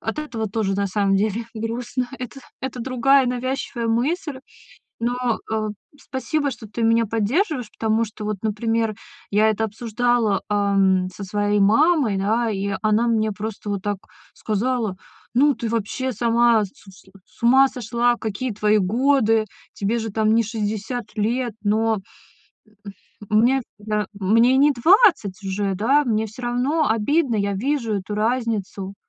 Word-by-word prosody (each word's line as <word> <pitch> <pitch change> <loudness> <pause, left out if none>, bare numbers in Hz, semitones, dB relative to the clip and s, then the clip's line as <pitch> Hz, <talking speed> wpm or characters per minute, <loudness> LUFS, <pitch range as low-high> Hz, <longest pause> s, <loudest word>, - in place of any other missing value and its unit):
от 225 - -4
этого 245 -8 -3
тоже, 195 -1 -1
на 200 +1 0
самом 195 0 +1
деле, 215 +3 0
грустно. 240 +3 -3
Это 250 +2 -7 0.2
это 260 -1 -5
другая 260 +2 +3
навязчивая 250 -1 -2
мысль, 265 +5 -1 0.6
но, 245 0 -1
э, 215 -1 0 0.3
спасибо, 285 +2 -2
что 230 -3 -9
ты 230 +3 -5
меня 230 0 +3
поддерживаешь, 245 - 0
потому 225 +1 +1
что 215 0 -9
вот, 210 -1 -2
например, 225 0 -1 0.4
я 215 +2 +4
это 220 +1 0
обсуждала, 225 -1 0
а, 200 -1 +1
м, 190 -1 +3
со 200 - -8
своей 205 +2 0
мамой, 225 - +3
да, 220 +4 +1
и 200 -1 -2
она 215 +2 +2
мне 220 -2 +1
просто 210 0 -6
вот 200 -2 -2
так 205 0 -2 0.4
сказала: 220 -1 -1 0.4
"Ну 280 +3 +4
ты 235 0 -4
вообще 230 +4 -2
сама 235 0 +3
с 200 - -6
сл 190 -1 -18
с - - -21
ума 265 +3 +6
сошла, 240 0 0
какие 230 +3 -3
твои 210 +1 +2
годы, 225 +2 +2 0.3
тебе 210 +4 -1
же 225 - -4
там 215 0 +2
не 230 - +3
60 220 +2 -3
лет?!" 235 +3 0
Но, 220 +2 +2 1.4
м 215 - +4
мне, 255 +3 +3 0.2
да 210 0 -2
мне 225 +6 +3
не 290 +2 +5
20 280 - +4
уже, 195 0 -2
да, 270 +9 +3
мне 220 -3 0
всё 220 +4 -11
равно 255 +6 +1
обидно, 235 +5 +1
я 200 0 0
вижу 235 +1 -1
эту 200 +1 -4
разницу. 210 -4 -2
225 Hz, 155 wpm, -22 LUFS, 210-245 Hz, 1.4 s, ума